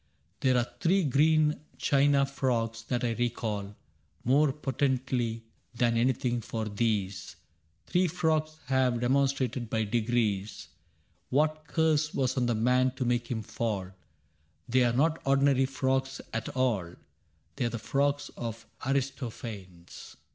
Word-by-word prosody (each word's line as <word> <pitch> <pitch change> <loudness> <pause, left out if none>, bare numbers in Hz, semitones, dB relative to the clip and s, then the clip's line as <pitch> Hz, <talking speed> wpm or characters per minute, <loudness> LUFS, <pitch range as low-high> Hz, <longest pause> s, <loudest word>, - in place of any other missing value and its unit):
There 130 -1 +3
are 120 - +2
three 185 +2 +3
green 150 +2 +3 0.2
china 140 0 +3
frogs 120 -4 -1
that 125 0 -1
I 120 - +1
recall 110 -4 -2 0.5
More 140 +4 +4
potently 130 -4 -1 0.3
than 120 -1 +2
anything^ 120 0 +1
for 110 0 -3
these 100 -5 -1 0.5
Three 180 +1 +2
frogs 155 -2 0
have 130 -1 +2
demonstrated^ 130 -1 0
by 110 -1 0
degrees^ 105 -3 -1 0.6
What 155 +3 +1
curse 155 -2 +1
was 130 -1 +1
on 125 -2 +1
the 120 - +1
man 125 +3 +2
to 130 - -2
make 120 0 0
him 110 -3 -2
fall: 100 -4 -3 0.8
^They 125 -1 +4
are 120 - -2
not 160 +3 +2
ordinary 135 -1 +3
frogs 135 0 -1
at 115 0 -2
all^ 110 -10 -1 0.6
They - - 0
are - - +1
the 115 - -4
Frogs 140 +5 0
of 115 -1 -6 0.2
Aristophanes. 115 -9 -4
125 Hz, 130 wpm, -29 LUFS, 115-140 Hz, 0.8 s, More